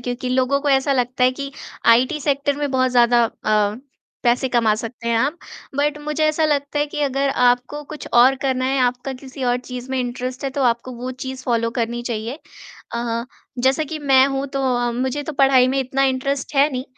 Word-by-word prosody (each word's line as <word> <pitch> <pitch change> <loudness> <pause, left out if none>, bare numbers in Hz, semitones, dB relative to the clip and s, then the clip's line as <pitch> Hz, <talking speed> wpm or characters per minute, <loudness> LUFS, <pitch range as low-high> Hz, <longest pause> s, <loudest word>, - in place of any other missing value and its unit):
क्योंकि 245 +1 -4
लोगों 260 +2 +1
को 290 - -1
ऐसा 270 +1 +3
लगता 250 0 +1
है 255 - +5
कि 275 - -4 0.4
आईटी 255 +6 +2
सेक्टर 285 0 0
में 290 -2 -2
बहुत 255 -1 +2
ज़्यादा 240 -1 +4
अ, - - -2 0.9
पैसे 245 +1 +2
कमा 230 -3 +2
सकते 230 +1 -6
हैं 230 - +2
आप। 285 +7 0 0.4
बट 295 +1 +1
मुझे 300 +1 -1
ऐसा 310 +1 +2
लगता 290 -1 0
है 295 - +1
कि 295 0 -5
अगर 275 0 0 0.2
आपको 250 +4 +1
कुछ 300 - -8
और 250 +3 +6
करना 260 -1 0
है 270 +1 +1
आपका 250 +2 -3
किसी 265 -1 -7
और 245 0 +2
चीज़ 250 0 -8
में 265 - -1
इंटरेस्ट 250 +1 -4
है 275 - -1
तो 275 - +1
आपको 240 +1 0
वो 250 +2 -5
चीज़ 260 0 -6
फॉलो 230 -2 0
करनी 235 +1 -2
चाहिए। 230 +5 -4 1.2
जैसा 265 +4 +2
कि 310 +1 -5
मैं 270 -2 +5
हूँ 270 0 -2
तो 275 0 -1
अ, 240 0 0
मुझे 260 +4 -2
तो 310 - -5
पढ़ाई 270 -2 +4
में 270 - 0
इतना 270 +1 -1
इंटरेस्ट 270 +2 -1
है 280 +2 +5
नहीं 255 +1 -3
260 Hz, 205 wpm, -21 LUFS, 245-280 Hz, 1.2 s, और